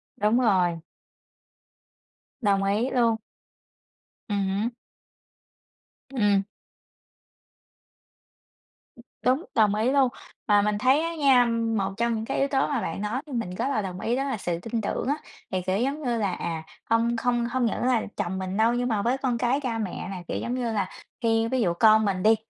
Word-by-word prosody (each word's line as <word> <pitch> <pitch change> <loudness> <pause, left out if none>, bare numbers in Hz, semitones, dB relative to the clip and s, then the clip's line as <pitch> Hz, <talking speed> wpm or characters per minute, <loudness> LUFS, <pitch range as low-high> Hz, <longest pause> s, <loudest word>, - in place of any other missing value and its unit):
Đúng 215 +4 +2
rồi. 185 -7 +3 1.6
Đồng 200 -3 +2
ý 210 +6 +1
luôn. 230 -3 +3 1.1
Ừm 200 -1 0
hứm. 200 +4 0 1.5
Ừm. 205 -4 +3 2.8
Đúng, 265 +7 +2
đồng 210 -2 +4
ý 220 +4 +1
luôn, 270 -2 +4 0.4
mà 205 -2 +5
mình 210 0 0
thấy 260 +7 +4
á 335 0 -3
nha, 270 -5 +5
một 225 -4 0
trong 235 0 +1
những 220 - -3
cái - - -2
yếu 275 - +3
tố 270 -1 +1
mà 275 -5 -1
bạn 165 - -4
nói 215 +6 -2
thì 280 - -8
mình 185 -7 -3
rất - - -1
là 245 -7 0
đồng 185 -1 -5
ý 235 +3 0
đó 270 - 0
là 270 -5 -2
sự 175 -3 -2
tin 230 +3 -3
tưởng 205 - -2
á 285 - +2 0.4
thì, 185 -1 0
kiểu 185 +2 0
giống 275 +5 -1
như 240 -3 0
là, 200 -4 0
à, 165 -2 -4 0.3
không 230 +1 +2
không 240 0 +1
hông 245 +1 0
những 230 - -1
là 250 -3 +3 0.2
chồng 190 +2 -2
mình 190 +1 -3
đâu 225 +2 +4
nhưng 245 +1 0
mà 215 -4 0
với 245 +5 +1
con 255 -3 -1
cái, 245 +4 +1
cha 235 -4 -2
mẹ 200 -4 -4
này, 185 -2 -6
kiểu - - -2
giống 240 - -3
như 240 -3 -1
là, 200 -4 -1 0.3
khi 225 -1 +2
ví 255 +1 0
dụ 175 -5 +2
con 215 +3 +5
mình 185 -2 -1
đi, 220 +1 +6
225 Hz, 185 wpm, -26 LUFS, 200-245 Hz, 2.8 s, đi